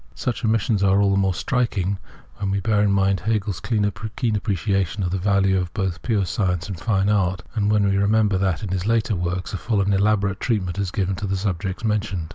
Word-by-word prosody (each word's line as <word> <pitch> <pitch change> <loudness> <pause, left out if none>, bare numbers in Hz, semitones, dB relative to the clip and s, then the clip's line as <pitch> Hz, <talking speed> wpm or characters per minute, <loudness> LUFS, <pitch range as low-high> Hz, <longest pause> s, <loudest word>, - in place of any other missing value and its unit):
Such 115 - -3
omissions 110 -1 +1
are 100 0 +4
all 100 -1 +3
the 100 - +2
more 95 -1 +2
striking 100 -7 -1 0.4
when 100 -1 -2
we 100 +1 0
bear 105 +1 +1
in 105 -1 +3
mind 100 -1 +2
Hegel's 105 -4 -1
keen 105 -1 0
appreciation 100 -3 -1
of 90 - -1
the 95 - -1
value 95 0 +2
of 90 -1 -3
both 95 -3 -2
pure 105 -5 0
science 90 -1 -1
and 95 -5 -6
fine 100 -3 +1
art, 95 -3 +1
and 105 -2 +1
when 105 -1 +3
we 100 - +2
remember 100 -1 +2
that, 95 -3 0
in 100 - -3
his 95 +1 -2
later 115 -1 +1
works, 90 +1 -3
a - - -1
full 110 +1 -1
and 100 +1 +2
elaborate 100 0 +1
treatment 100 -6 -1
is 100 -2 -1
given 95 0 -1
to 105 -1 -3
the 95 0 -1
subjects 95 0 -3
just - - +1
mentioned. 100 -6 -2
100 Hz, 225 wpm, -22 LUFS, 95-105 Hz, 0.4 s, are